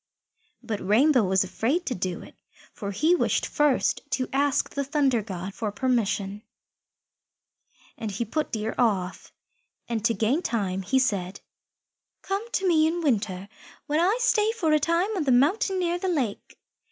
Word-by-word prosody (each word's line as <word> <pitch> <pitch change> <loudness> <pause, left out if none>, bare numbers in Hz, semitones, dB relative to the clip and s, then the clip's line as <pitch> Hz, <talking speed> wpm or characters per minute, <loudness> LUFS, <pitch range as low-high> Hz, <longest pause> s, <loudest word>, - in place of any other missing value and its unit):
But 225 -3 -3
Rainbow 250 +7 +4
was 190 0 +2
afraid 250 - -1
to 255 - -1
do 185 -3 -4
it, - - -14 0.4
for 200 - -6
he 305 - +2
wished 355 - +1
first 295 -3 +1
to 255 -1 0
ask 280 0 +1
the 280 - -2
Thunder 275 -4 +1
God 190 -2 -6
for 210 +1 -3
permission, 210 -4 -1 1.6
and 220 - -3
he 210 +4 -3
put 305 +7 -2
Deer 220 0 -2
off, 195 -7 0 0.6
and 230 -2 -2
to 230 -1 +2
gain 250 +9 +1
time 195 - -2
he 200 +8 0
said, 200 -8 0 0.8
"Come 390 +2 -2
to 385 - +1
me 315 -3 +4
in 340 +2 -1
winter, 205 -8 -1 0.4
when 300 +2 0
I 380 +7 +3
stay 440 -3 +3
for 355 -9 0
a 305 - +4
time 335 +8 0
on 355 - 0
the 265 - +2
mountain 335 - +3
near 350 -1 0
the 380 - -2
lake. 260 - -3
255 Hz, 165 wpm, -26 LUFS, 205-315 Hz, 1.6 s, Rainbow